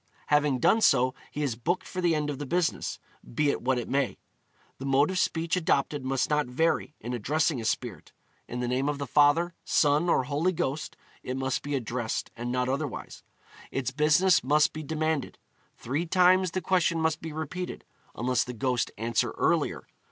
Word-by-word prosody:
Having 150 Hz, -2 st, +3 dB
done 220 Hz, -, +3 dB
so, 130 Hz, -9 st, +4 dB, 0.2 s
he 150 Hz, -, -4 dB
is 130 Hz, -6 st, -1 dB
booked 175 Hz, +11 st, -1 dB
for 185 Hz, -, -4 dB
the 170 Hz, -2 st, +3 dB
end 150 Hz, -1 st, -1 dB
of 140 Hz, -, -6 dB
the 145 Hz, -, -4 dB
business, 175 Hz, +3 st, -1 dB, 0.4 s
be 145 Hz, +1 st, +3 dB
it -, -, -4 dB
what 130 Hz, +1 st, +1 dB
it 120 Hz, -, -3 dB
may. 140 Hz, 0 st, 0 dB, 0.6 s
The 135 Hz, -, -6 dB
mode 140 Hz, +5 st, +3 dB
of 185 Hz, -, -1 dB
speech 165 Hz, 0 st, 0 dB
adopted 145 Hz, -5 st, 0 dB
must 135 Hz, 0 st, 0 dB
not 150 Hz, -2 st, +1 dB
vary, 150 Hz, +3 st, 0 dB
in 120 Hz, +3 st, -5 dB
addressing 145 Hz, +3 st, 0 dB
a -, -, -6 dB
spirit; 110 Hz, -6 st, -3 dB, 0.4 s
in 125 Hz, +1 st, -4 dB
the 125 Hz, -, -1 dB
name 130 Hz, +3 st, 0 dB
of 150 Hz, -, -2 dB
the 140 Hz, -, -3 dB
Father, 150 Hz, +6 st, +3 dB
Son, 150 Hz, +3 st, +2 dB
or 130 Hz, -, +3 dB
Holy 150 Hz, +8 st, 0 dB
Ghost 150 Hz, -2 st, -3 dB, 0.2 s
it 130 Hz, +1 st, -4 dB
must 130 Hz, 0 st, -1 dB
be 145 Hz, 0 st, -3 dB
addressed, 120 Hz, -2 st, -3 dB
and 120 Hz, +1 st, -4 dB
not 125 Hz, 0 st, 0 dB
otherwise. 140 Hz, +1 st, -4 dB, 0.5 s
Its 130 Hz, -1 st, -2 dB
business 155 Hz, +5 st, +4 dB
must 150 Hz, +3 st, +3 dB
be 155 Hz, -, -5 dB
demanded; 155 Hz, -1 st, -2 dB, 0.4 s
three 145 Hz, +8 st, -2 dB
times 185 Hz, +1 st, +4 dB
the 185 Hz, +3 st, -3 dB
question 170 Hz, -2 st, +1 dB
must 160 Hz, 0 st, 0 dB
be 160 Hz, -, -6 dB
repeated, 160 Hz, +4 st, -5 dB, 0.3 s
unless 125 Hz, +2 st, +1 dB
the 125 Hz, -, -7 dB
ghost 125 Hz, +1 st, 0 dB
answer 115 Hz, +1 st, 0 dB
earlier. -, -, +1 dB
145 Hz, 190 wpm, -28 LUFS, 130-160 Hz, 0.6 s, so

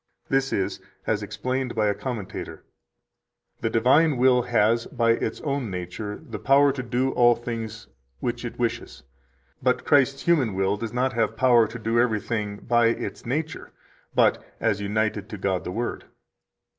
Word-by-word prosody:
This 135 Hz, 0 st, +1 dB
is, 95 Hz, -, -1 dB, 0.3 s
as 105 Hz, -1 st, 0 dB
explained 125 Hz, +5 st, -3 dB
by 110 Hz, -1 st, +2 dB
a 105 Hz, -, +2 dB
commentator: 115 Hz, -5 st, -6 dB, 1.0 s
"The 115 Hz, -, -1 dB
divine 130 Hz, +7 st, +4 dB
will 125 Hz, 0 st, +4 dB
has, 115 Hz, -1 st, +2 dB
by 115 Hz, -2 st, +2 dB
its 115 Hz, -1 st, -1 dB
own 140 Hz, -6 st, -2 dB
nature, 95 Hz, +3 st, -5 dB
the 115 Hz, -4 st, -6 dB
power 140 Hz, +1 st, +5 dB
to 135 Hz, -1 st, -4 dB
do 125 Hz, +2 st, 0 dB
all 120 Hz, -1 st, +5 dB
things 115 Hz, -2 st, -6 dB, 0.3 s
which 120 Hz, -, -3 dB
it 120 Hz, -, -6 dB
wishes; 115 Hz, -, -3 dB, 0.6 s
but -, -, +1 dB
Christ's 140 Hz, -1 st, +3 dB
human 135 Hz, -, +2 dB
will 95 Hz, +1 st, +1 dB
does 110 Hz, +1 st, -5 dB
not 125 Hz, +2 st, 0 dB
have 115 Hz, -1 st, 0 dB
power 120 Hz, -3 st, +5 dB
to 115 Hz, +2 st, -8 dB
do 115 Hz, +1 st, 0 dB
everything 110 Hz, -3 st, 0 dB
by 120 Hz, -1 st, +4 dB
its 115 Hz, -, -3 dB
nature, 155 Hz, +5 st, -3 dB, 0.4 s
but -, -, +3 dB, 0.2 s
as 100 Hz, -, 0 dB
united 105 Hz, 0 st, -1 dB
to 105 Hz, -, -6 dB
God 95 Hz, -1 st, -1 dB
the -, -, -3 dB
Word." 120 Hz, +5 st, -3 dB
115 Hz, 160 wpm, -25 LUFS, 105-130 Hz, 1.0 s, power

